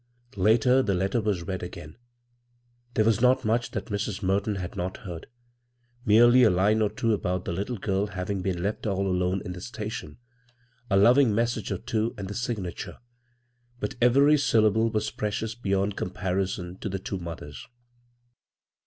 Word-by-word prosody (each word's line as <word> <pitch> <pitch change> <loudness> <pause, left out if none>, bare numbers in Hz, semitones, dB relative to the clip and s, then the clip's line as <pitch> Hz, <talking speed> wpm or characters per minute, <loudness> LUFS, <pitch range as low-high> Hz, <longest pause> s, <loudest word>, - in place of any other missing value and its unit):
Later, 115 +6 +4
the 100 -7 0
letter 95 +6 0
was 100 -5 -1
read 95 +1 -4
again. 80 -4 -8 1.0
There 110 - +3
was 115 0 +2
not 130 +1 +4
much 115 +2 +1
that - - -4
Mrs. 100 0 -3
Merton 100 +2 +1
had 90 -3 -5
not 90 +1 -3
heard 85 -4 -7 0.4
— 120 0 -35
merely 120 +4 +7
a 115 - +7
line 105 +4 +2
or 105 - +2
two 110 +2 0
about 90 -3 -2
the - - -2
litde 100 +4 -4
girl 100 0 0
having 95 0 -3
been 90 -2 -2
left 105 +2 -2
all 100 -1 0
alone 90 0 0
in 90 - -4
the 90 - -9
station, 110 -8 -6 0.7
a 95 - +3
loving 120 +2 +5
message 115 -2 -1
or 95 - -1
two, 110 +4 -2
and 100 -2 -5
the 100 - -5
signature; 105 -5 -4 0.8
but 135 - -3
every 140 +5 +5
syllable 110 -3 +3
was 110 -1 -1
precious 105 +1 -3
beyond 100 -3 -1
com - - -3
parison 95 -1 -3
to 105 - -4
the 95 - -2
two 95 0 -5
mothers. 85 -4 -8
105 Hz, 170 wpm, -26 LUFS, 95-115 Hz, 1.0 s, merely